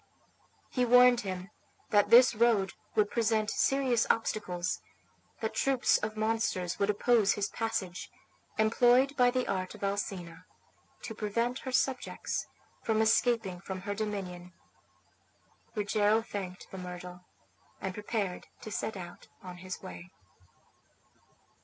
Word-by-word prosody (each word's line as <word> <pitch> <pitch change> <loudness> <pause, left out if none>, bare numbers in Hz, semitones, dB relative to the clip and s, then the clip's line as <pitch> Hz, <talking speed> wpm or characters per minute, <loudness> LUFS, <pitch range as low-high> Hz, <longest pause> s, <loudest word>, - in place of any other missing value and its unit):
He 250 - +1
warned 245 0 +6
him 190 -1 -5 0.4
that 205 -1 +4
this 240 +2 +8
road 220 -4 +2 0.2
would 205 -1 +2
present 220 -2 +1
serious 265 -4 +2
obstacles; 180 -5 -1 0.6
that - - -2
troops 270 -2 +3
of 215 0 -4
monsters 215 -5 -1
would 200 - +1
oppose 210 0 +3
his 205 -1 -2
passage, 190 -5 -3 0.5
employed 245 +5 +4
by 250 -2 +5
the 255 0 -1
art 185 -1 -2
of - - -11
Alcina 195 -4 -4 0.6
to 225 - -5
prevent 230 +4 -1
her 260 - -6
subjects 255 0 -1 0.3
from 220 -1 0
escaping 220 -4 +2
from 190 -1 -6
her 205 +1 -3
dominion. 190 -4 -5 1.2
Rogero 210 +1 +2
thanked 190 -4 -7
the 190 - -7
myrtle, 180 0 -8 0.6
and 190 - -4
prepared 205 -2 -3
to 215 - -8
set 210 +1 -3
out 175 -1 -10 0.2
on 180 -1 -8
his 185 +1 -7
way. 180 -1 -9
210 Hz, 125 wpm, -30 LUFS, 185-230 Hz, 1.2 s, this